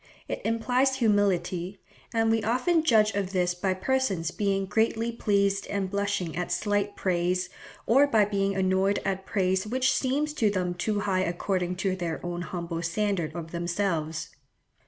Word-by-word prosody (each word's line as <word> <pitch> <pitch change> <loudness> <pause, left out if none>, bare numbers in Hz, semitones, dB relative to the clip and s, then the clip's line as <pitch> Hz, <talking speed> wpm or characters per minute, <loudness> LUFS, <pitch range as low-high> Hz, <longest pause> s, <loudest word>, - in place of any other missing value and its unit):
It - - -4
implies 250 +4 +1
humility, 195 -5 +1 0.3
and 225 -1 +2
we 225 0 +2
often 255 - +2
judge 220 -7 +4
of 195 -1 -2
this 180 -1 +1
by 185 +1 -1
persons 190 -6 0
being 195 -1 0
greatly 225 +3 +1
pleased 200 -3 +1
and 195 -2 -2
blushing 200 -4 -1
at 180 +1 -3
slight 205 -1 0
praise, 180 0 0 0.4
or 275 +5 +5
by 220 -6 +4
being 195 -1 0
annoyed 190 +1 +2
at 190 0 -2
praise 190 0 0
which 255 +3 +2
seems 290 +3 0
to 225 -8 +2
them 180 -3 -1
too 205 +3 -1
high 190 -2 +1
according 180 0 -1
to 190 -1 +1
their 170 -3 -3
own 175 0 -3
humble 170 -2 -4
standard 175 -2 -1
of 165 -1 -6
themselves. 170 -2 -2
195 Hz, 155 wpm, -27 LUFS, 180-220 Hz, 0.4 s, or